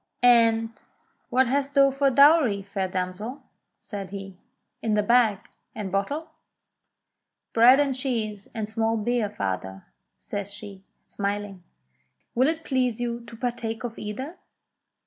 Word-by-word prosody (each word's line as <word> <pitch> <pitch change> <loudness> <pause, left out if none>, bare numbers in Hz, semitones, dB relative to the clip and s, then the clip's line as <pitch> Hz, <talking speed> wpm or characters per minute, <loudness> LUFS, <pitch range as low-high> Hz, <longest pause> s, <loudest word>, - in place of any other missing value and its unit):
"And 230 -2 +5 0.6
what 260 +1 +4
hast 280 +3 -1
thou 275 -1 +6
for 275 +1 +2
dowry, 280 -7 +5
fair 195 -1 -3
damsel.?" 185 +8 -4 0.4
said 200 -3 -7
he, 195 -1 -8 0.5
"in 220 -2 +1
thy 210 - +2
bag 230 -2 +4 0.4
and 205 -4 -5
bottle?" 280 - -2 1.2
"Bread 245 +4 +7
and 280 -2 +2
cheese 225 -6 -3
and 220 -2 -2
small 225 +1 0
beer, 225 0 0
father," 95 - -4 0.3
says 200 0 -5
she, 205 -2 -9 0.2
smiling. 200 -1 -4 0.7
"Will 255 +3 +3
it 320 +1 -1
please 250 -4 0
you 240 -1 -2
to 230 - -11
partake 235 -2 -3
of 235 -2 -5
either 260 - -6
225 Hz, 130 wpm, -25 LUFS, 200-255 Hz, 1.2 s, Bread